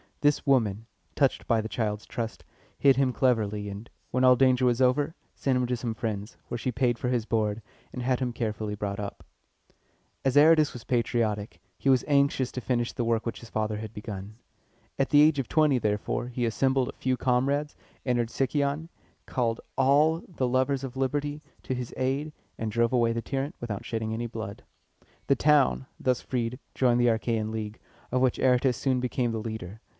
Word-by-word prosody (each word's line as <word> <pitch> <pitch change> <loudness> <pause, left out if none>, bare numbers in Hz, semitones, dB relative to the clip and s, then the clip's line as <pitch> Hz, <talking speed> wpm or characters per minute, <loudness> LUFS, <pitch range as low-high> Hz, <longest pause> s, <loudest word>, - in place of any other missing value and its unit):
This 145 0 +2
woman, 115 -6 +2 0.3
touched 135 -3 +1
by 115 -2 +3
the 110 - -5
child's 105 -3 -2
trust, 115 -1 -5 0.3
hid 135 -2 +5
him 135 -1 +2
cleverly, 105 -5 +1
and, 100 +3 -8 0.2
when 130 +1 +1
all 130 0 +7
danger 130 0 +4
was 120 0 +2
over, 140 +5 +2 0.2
sent 135 -2 0
him 125 - +1
to 125 0 -1
some 115 -1 -3
friends, 105 -1 -4
where 120 - -4
she 130 - -1
paid 120 0 +1
for 125 - -1
his 120 -3 0
board, 110 -1 0 0.3
and 125 - -5
had 125 0 +1
him 125 -2 -2
carefully 110 -2 -3
brought 100 -1 -3
up. 100 -1 -6 1.0
As 135 +1 +2
Aratus 155 0 +6
was 120 - -9
patriotic, 110 -6 -1 0.2
he 135 - 0
was 130 -2 +4
anxious 140 -3 +2
to 125 - -5
finish 120 -1 -1
the 120 - -2
work 115 -1 0
which 115 - -4
his 115 - -12
father 110 -1 -1
had 110 0 -7
begun. 105 -1 -7 0.6
At 135 - +1
the 145 - +6
age 150 -2 +4
of 130 - -2
twenty, 150 -5 +3
therefore, 105 +2 -1
he 125 -1 -2
assembled 130 +3 +1
a - - -7
few 130 -1 -1
comrades, 140 +4 +1 0.3
entered 120 -3 +1
Sicyon, 140 +5 -1 0.4
called 115 -3 -1 0.2
all 150 +5 +4
the 135 -8 -2
lovers 130 +2 +1
of 130 -1 -6
liberty 145 +2 -1 0.2
to - - -2
his 125 -1 -5
aid, 135 +4 -1 0.3
and 110 -1 -2
drove 115 +2 +1
away 120 -2 +3
the 115 0 -2
tyrant 135 +4 -3
without 110 -4 -5
shedding 110 -1 -2
any 120 +1 -2
blood. 110 -3 -7 0.6
The 140 - +4
town, 145 -2 +3
thus 130 -1 +1
freed, 125 0 -2 0.2
joined 125 -2 +3
the 120 - +4
Achæan 110 -1 0
League, 110 -1 -5 0.3
of 125 0 +1
which 130 -2 +2
Aratus 125 -1 +3
soon 130 -2 +1
became 125 -1 -1
the 110 - -2
leader. 110 -2 -6
125 Hz, 190 wpm, -27 LUFS, 110-135 Hz, 1.0 s, all